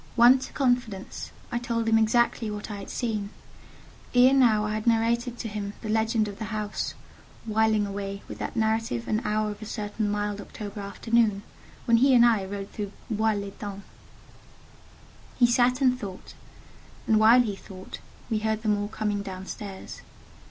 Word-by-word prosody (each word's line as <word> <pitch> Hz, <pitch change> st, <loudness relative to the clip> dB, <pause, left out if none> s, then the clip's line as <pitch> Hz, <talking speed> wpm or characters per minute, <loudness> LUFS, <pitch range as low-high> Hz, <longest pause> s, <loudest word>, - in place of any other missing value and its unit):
Won 245 Hz, +2 st, +7 dB
to -, -, -7 dB
confidence, 245 Hz, -7 st, -1 dB, 0.2 s
I 240 Hz, -, 0 dB
told 230 Hz, -1 st, -2 dB
him 225 Hz, 0 st, +5 dB
exactly 225 Hz, 0 st, +2 dB
what 210 Hz, +1 st, -5 dB
I 205 Hz, -, -5 dB
had 200 Hz, -, -8 dB
seen: 215 Hz, -5 st, -2 dB, 0.9 s
ere 250 Hz, +2 st, +7 dB
now 230 Hz, -6 st, +4 dB
I 215 Hz, -, -2 dB
had 215 Hz, +2 st, -3 dB
narrated 235 Hz, +1 st, +2 dB
to 230 Hz, -, -4 dB
him 205 Hz, -1 st, -4 dB
the 215 Hz, -, -5 dB
legend 220 Hz, 0 st, +1 dB
of 200 Hz, -1 st, -8 dB
the 220 Hz, -, -3 dB
house—whiling 215 Hz, 0 st, -2 dB
away 200 Hz, 0 st, -5 dB
with -, -, -8 dB
that -, -, -4 dB
narrative 220 Hz, -, 0 dB
an 215 Hz, +1 st, 0 dB
hour 210 Hz, 0 st, 0 dB
of 205 Hz, +1 st, -10 dB
a 215 Hz, -, -7 dB
certain 210 Hz, -1 st, -3 dB
mild 205 Hz, 0 st, -2 dB
October 205 Hz, 0 st, -8 dB
afternoon, 210 Hz, +1 st, +1 dB, 0.4 s
when 230 Hz, -1 st, +5 dB
he 265 Hz, +2 st, +5 dB
and 240 Hz, -1 st, +7 dB
I 225 Hz, -4 st, +3 dB
rode 200 Hz, 0 st, -6 dB
through 205 Hz, -2 st, -5 dB, 0.2 s
Bois 220 Hz, +1 st, +2 dB
l'Etang. 200 Hz, 0 st, -6 dB, 1.5 s
He 245 Hz, -, +6 dB
sat 245 Hz, +2 st, +3 dB
and 255 Hz, -1 st, +3 dB
thought, 195 Hz, -5 st, -8 dB, 0.7 s
and 220 Hz, -1 st, +4 dB
while 230 Hz, +3 st, +7 dB
he 210 Hz, -4 st, -3 dB
thought, 190 Hz, -1 st, -10 dB, 0.3 s
we 220 Hz, -3 st, 0 dB
heard 220 Hz, 0 st, -1 dB
them 210 Hz, -2 st, +2 dB
all 205 Hz, -, -2 dB
coming 210 Hz, -1 st, -2 dB
down 190 Hz, -1 st, -7 dB
stairs. 195 Hz, -1 st, -8 dB
215 Hz, 170 wpm, -26 LUFS, 205-230 Hz, 1.5 s, Won